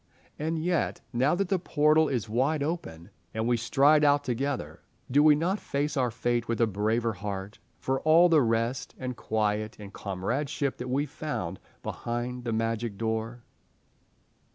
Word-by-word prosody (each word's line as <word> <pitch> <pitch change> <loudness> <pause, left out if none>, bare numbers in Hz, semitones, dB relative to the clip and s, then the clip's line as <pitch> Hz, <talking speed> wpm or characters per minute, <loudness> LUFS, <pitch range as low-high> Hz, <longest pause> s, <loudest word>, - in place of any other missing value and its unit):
And 160 +2 -1
yet, 170 0 0
now 130 +7 +3
that 195 0 -1
the 190 - +2
portal 155 -1 +3
is 120 -5 -1
wide 135 +7 +1
open 100 - -5 0.2
and 110 +1 0
we 120 - +3
stride 140 +6 +4
out 145 0 +4
together, 135 +2 -3 0.3
do 145 +3 +5
we 150 0 +7
not 180 +7 0
face 145 +1 -2
our 130 -3 +2
fate 120 +1 -1
with 115 -1 -1
a 115 - +5
braver 110 +3 0
heart 100 +1 -6 0.2
for 135 0 -1
all 165 +3 +6
the 160 -3 +5
rest 115 +2 -1
and 125 -1 -4
quiet 110 -1 -1
and 100 -1 -10
comradeship 130 +9 -2
that 125 +1 -5
we 140 +3 +1
found 145 - -4 0.2
behind 120 +1 -4
the 115 - -1
Magic 115 -1 -1
Door? 115 +2 -3
125 Hz, 160 wpm, -28 LUFS, 110-150 Hz, 0.3 s, we